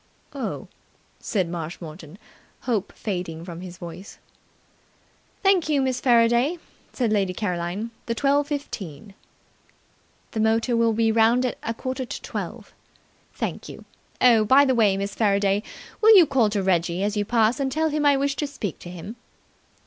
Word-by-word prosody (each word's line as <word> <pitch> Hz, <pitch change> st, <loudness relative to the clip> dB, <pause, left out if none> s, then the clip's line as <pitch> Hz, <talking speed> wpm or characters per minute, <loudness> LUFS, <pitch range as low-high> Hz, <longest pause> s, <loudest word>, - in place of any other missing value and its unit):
"Oh!" -, -, -5 dB, 0.5 s
said 190 Hz, -6 st, -1 dB
Marshmoreton, 165 Hz, 0 st, -7 dB, 0.4 s
hope 220 Hz, -6 st, -1 dB
fading 175 Hz, -5 st, -5 dB
from 170 Hz, -1 st, -8 dB
his 180 Hz, -1 st, -9 dB
voice. 180 Hz, +3 st, -10 dB, 1.3 s
"Thank 385 Hz, -5 st, +3 dB
you, 295 Hz, -2 st, +2 dB
Miss 260 Hz, -2 st, 0 dB
Faraday," 240 Hz, +5 st, +3 dB, 0.3 s
said 235 Hz, -4 st, 0 dB
Lady 195 Hz, -3 st, 0 dB
Caroline. 180 Hz, +3 st, -3 dB, 0.2 s
"The 230 Hz, -, -1 dB
twelve 285 Hz, +3 st, +2 dB
fifteen." 205 Hz, -, -6 dB, 1.2 s
"The 220 Hz, -, -4 dB
motor 225 Hz, +2 st, +2 dB
will 230 Hz, -1 st, +3 dB
be 225 Hz, 0 st, +2 dB
round 230 Hz, +3 st, +3 dB
at 250 Hz, -, -3 dB
a 230 Hz, -, -3 dB
quarter 260 Hz, +2 st, -4 dB
to -, -, -7 dB
twelve." -, -, -6 dB, 0.6 s
"Thank -, -, -4 dB
you. -, -, -11 dB, 0.3 s
Oh, 235 Hz, -3 st, +5 dB
by 265 Hz, +6 st, +6 dB
the 260 Hz, -, +2 dB
way, 210 Hz, -5 st, +3 dB
Miss 200 Hz, +1 st, -3 dB
Faraday, 200 Hz, -2 st, +2 dB, 0.4 s
will 440 Hz, -1 st, +8 dB
you 355 Hz, -, +8 dB
call 250 Hz, -7 st, +2 dB
to 205 Hz, -2 st, -1 dB
Reggie 175 Hz, 0 st, +1 dB
as 205 Hz, +1 st, -1 dB
you 205 Hz, -, +1 dB
pass, 230 Hz, +3 st, +2 dB
and 270 Hz, -1 st, -1 dB
tell 315 Hz, +3 st, +1 dB
him 300 Hz, 0 st, -1 dB
I 285 Hz, -1 st, +5 dB
wish 275 Hz, 0 st, 0 dB
to 295 Hz, -, -1 dB
speak 220 Hz, -, -5 dB
to 175 Hz, -, -10 dB
him." 180 Hz, +6 st, -8 dB
225 Hz, 160 wpm, -24 LUFS, 190-260 Hz, 1.3 s, will